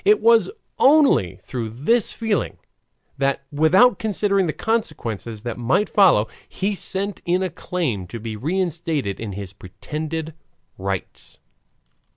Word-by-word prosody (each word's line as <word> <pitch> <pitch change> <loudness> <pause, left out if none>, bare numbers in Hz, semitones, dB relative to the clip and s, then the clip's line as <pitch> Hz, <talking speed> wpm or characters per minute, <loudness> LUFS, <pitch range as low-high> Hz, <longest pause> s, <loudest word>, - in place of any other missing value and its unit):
It 420 +1 +5
was 230 - +5 0.3
only 275 - +5
through 120 -4 -4
this 160 - +1
feeling 220 -3 -1 0.6
that, 140 0 0
without 165 +12 +4
considering 200 -3 +1
the - - 0
consequences 120 - -3
that 120 -1 -4
might 130 - +1
follow, 175 - +5 0.2
he 200 +2 -1
sent 200 +1 -2
in 180 +2 +1
a 185 - -2
claim 125 - -3
to 115 - -7
be 110 0 -5
reinstated 160 - -2
in 110 -3 -5
his 100 -1 -7
pretended 155 - -6 0.5
rights. 95 -1 -5
160 Hz, 130 wpm, -22 LUFS, -, 0.6 s, It